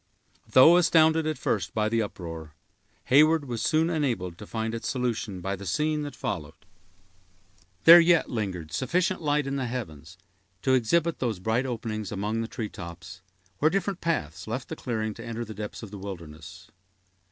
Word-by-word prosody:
Though 160 +7 +7
astounded, 160 -2 +4
at 155 - -2
first, 95 -5 -2
by 110 -1 +1
the 115 +1 +1
uproar, 80 -7 -7 0.6
Heyward 155 +2 +5
was 120 -4 -4
soon 160 +6 +2
enabled 120 - -1
to 105 - -9
find 110 0 -3
its 115 - -4
solution 115 -7 -2
by 95 +2 -2
the 100 - -10
scene 150 - 0
that 145 -1 -6
followed. 80 -3 -4 1.3
There 170 +1 +11
yet 170 -1 +4
lingered 95 -8 -4
sufficient 175 - 0
light 150 -2 +1
in 135 0 -2
the 130 -2 -2
heavens 85 - -7 0.5
to 130 - +3
exhibit 160 +7 +2
those 115 -6 -1
bright 110 +8 0
openings 110 -4 -4
among 105 +3 -2
the 115 - -3
tree 110 -1 -4
tops, 90 +1 -10 0.4
where 155 - +4
different 195 +1 -2
paths 95 - -2
left 120 +4 -4
the - - -4
clearing 110 -3 -3
to 115 - -10
enter 115 0 -5
the 110 - -8
depths 105 +2 -7
of 105 - -9
the 100 - -8
wilderness. 85 0 -9
115 Hz, 175 wpm, -27 LUFS, 95-150 Hz, 1.3 s, There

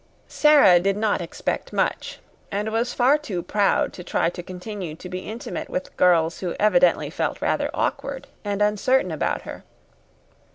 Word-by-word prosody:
Sara 290 - +6
did 195 +2 0
not 210 -3 0
expect 170 - -4
much, - - -1 0.3
and 210 +2 -2
was 230 +2 0
far 265 +5 +3
too 195 - -4
proud 205 -1 +1
to 180 - -9
try 170 - 0
to 175 - -7
continue 180 -2 -7
to 180 - -10
be 185 0 -5
intimate 220 +5 -6
with 185 - -5
girls 170 -2 +3
who 180 -2 -3
evidently 180 -4 +3
felt - - -2
rather - - 0
awkward - - -3 0.2
and 205 0 0
uncertain 210 0 +2
about 155 - -2
her. - - -9
195 Hz, 160 wpm, -23 LUFS, 180-220 Hz, 0.3 s, Sara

